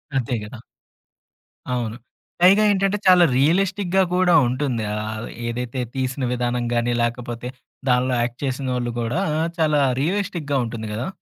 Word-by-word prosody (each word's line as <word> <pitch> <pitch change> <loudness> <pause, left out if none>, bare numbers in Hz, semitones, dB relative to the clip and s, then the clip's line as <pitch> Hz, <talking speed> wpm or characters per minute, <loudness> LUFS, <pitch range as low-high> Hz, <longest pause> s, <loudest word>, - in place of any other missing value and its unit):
అంతే 125 -2 -1
గదా! 110 +3 -9 1.1
అవును. 120 -2 -2 0.4
పైగా 195 +4 +6
ఏంటంటే 195 +1 +1
చాలా 180 -1 +7
రియలిస్టిక్‌గా 190 +5 +2
కూడా 180 -1 +3
ఉంటుంది. 125 -3 -1
ఆహ్, 110 +1 -4 0.2
ఏదైతే 125 +2 -4 0.2
తీసిన 130 0 -2
విధానంగాని 120 -1 0
లేకపోతే 120 0 -3 0.4
దానిలో 125 +1 +2
యాక్ట్ 120 0 -3
చేసినోళ్ళు 125 -2 -2
గూడా 120 +10 -1 0.4
చాలా 155 -2 +2 0.2
రియలిస్టిక్‌గా 170 -4 -1
ఉంటుంది 115 -1 -5
గదా! 115 +7 -3
125 Hz, 120 wpm, -22 LUFS, 120-170 Hz, 1.1 s, చాలా